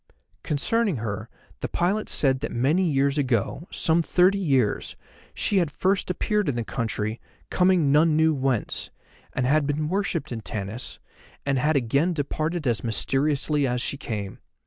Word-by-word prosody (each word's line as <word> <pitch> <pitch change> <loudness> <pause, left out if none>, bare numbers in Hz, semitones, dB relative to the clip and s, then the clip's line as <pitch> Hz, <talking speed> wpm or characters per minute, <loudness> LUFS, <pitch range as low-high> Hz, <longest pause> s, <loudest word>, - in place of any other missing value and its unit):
Concerning 200 +6 +1
her 105 -3 -4 0.3
the - - -3
pilot 195 +5 -1
said 130 -2 +2
that - - -4
many 155 +9 +2
years 140 0 +1
ago, 130 - -1
some 165 +1 +2
thirty 185 +4 +3
years, 135 - 0 0.4
she 205 - +1
had 175 -5 +2
first 190 +7 0
appeared 210 +1 0
in 135 - -1
the 120 - -1
country, 110 -1 -3 0.3
coming 180 -6 +3
none 155 +1 +4
knew 160 0 +4
whence, 130 -5 -1 0.4
and 130 - -1
had 145 +2 +2
been 150 +1 -1
worshipped 180 -6 -2
in 115 -2 -4
Tanis, 105 +3 -5 0.5
and 135 -2 +1
had 150 +4 +1
again 140 +7 +1
departed 155 +2 -2
as 115 -5 0
mysteriously 140 +5 +1
as 125 0 -1
she 120 - -1
came. 105 -7 -5
145 Hz, 155 wpm, -25 LUFS, 125-170 Hz, 0.5 s, none